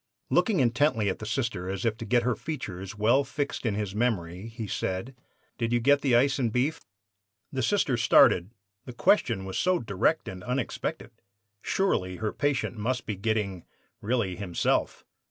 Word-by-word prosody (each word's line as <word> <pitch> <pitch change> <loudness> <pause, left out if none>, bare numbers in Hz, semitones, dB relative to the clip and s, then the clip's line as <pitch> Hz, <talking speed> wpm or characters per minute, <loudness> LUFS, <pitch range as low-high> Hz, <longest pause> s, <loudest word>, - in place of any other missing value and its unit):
Looking 215 -8 +3
intently 120 -3 +2
at 95 - -3
the 110 - -6
Sister, 110 -7 -2
as 95 +3 -3
if 110 -2 +1
to 115 - -6
get 120 +2 +2
her 125 0 +1
features 95 - -6
well 120 +7 +4
fixed 140 -3 -3
in 105 - 0
his 105 -2 -3
memory, 100 -4 -1
he 115 -1 -6
said: 95 +5 -3 0.4
"'Did 115 -1 -1
you 120 - +3
get 140 +4 +4
the 130 -4 +3
ice 135 +3 +3
and 120 -4 +1
beef?' 135 +7 0 0.7
"The 135 - -2
Sister 140 - +1
started. 95 -5 +5 0.4
The 125 - -8
question 115 - +2
was 95 - -3
so 185 0 +3
direct 100 - 0
and 90 -1 -7
unexpected. 125 0 -3 0.5
Surely 95 - 0
her 110 +2 -3
patient 140 -4 -1
must 120 +3 -2
be 105 - -3
getting 100 -3 -1 0.4
really 105 -5 0
himself! 90 -2 -1
115 Hz, 170 wpm, -27 LUFS, 100-130 Hz, 0.7 s, started